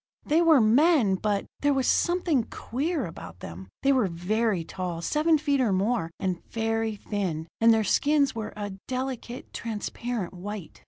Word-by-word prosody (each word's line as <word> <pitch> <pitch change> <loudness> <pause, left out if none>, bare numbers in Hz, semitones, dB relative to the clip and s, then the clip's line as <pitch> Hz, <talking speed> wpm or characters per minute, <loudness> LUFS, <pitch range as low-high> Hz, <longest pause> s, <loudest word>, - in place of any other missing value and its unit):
They 315 +3 +3
were 325 -4 +6
men 245 - +4
but 200 +1 0
there 285 -1 +2
was 265 -1 +1
something 345 -8 +2
queer 290 +3 -2
about 90 - -9
them. 90 +3 -8
They 275 - +4
were 255 -7 +3
very 190 +2 0
tall 175 -1 -5
seven 310 - +3
feet 285 -2 +1
or 230 -5 +2
more 195 -1 +1
and 185 -2 -2
very 225 -1 -1
thin; 185 -7 -3
and 230 0 +6
their 220 -1 +3
skins 285 +7 +2
were 215 -1 -5
a 205 -1 -4 0.2
delicate, 255 -1 -4
transparent 230 -2 -4
white. 190 -1 -7
225 Hz, 160 wpm, -27 LUFS, 190-270 Hz, 0.2 s, were